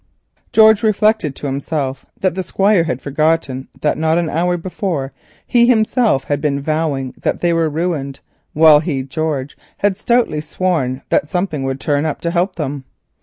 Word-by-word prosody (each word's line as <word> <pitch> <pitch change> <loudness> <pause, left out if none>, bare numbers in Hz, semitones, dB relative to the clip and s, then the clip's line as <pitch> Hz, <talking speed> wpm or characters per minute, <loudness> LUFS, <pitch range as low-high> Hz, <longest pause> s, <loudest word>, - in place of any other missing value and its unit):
George 220 -1 +6
reflected 215 - +1
that 140 +4 -3
the 190 - -3
Squire 195 0 +2
had 130 -5 -3
forgotten 145 -2 0
that 150 - 0
not 160 +1 +2
an 170 -2 -1
hour 175 +3 0
before 170 -6 -3 0.3
he 240 -1 +3
himself 220 - +2
had 145 0 -2
been 145 -2 0
vowing 145 -3 -2
that - - -1
they 175 -1 +2
were 165 -1 +1
ruined, 150 -4 -3 0.3
while 155 -1 +7
he, 150 -4 -2
George, 140 0 -3 0.2
had 205 -1 +1
stoutly 230 -10 +1
sworn 150 -5 -2
that - - +1
something 175 -5 -2
would 135 0 -3
turn 145 +2 0
up 150 - -3
to 170 - -1
help 180 +3 0
them. 145 -4 -4
160 Hz, 160 wpm, -17 LUFS, 140-185 Hz, 0.3 s, while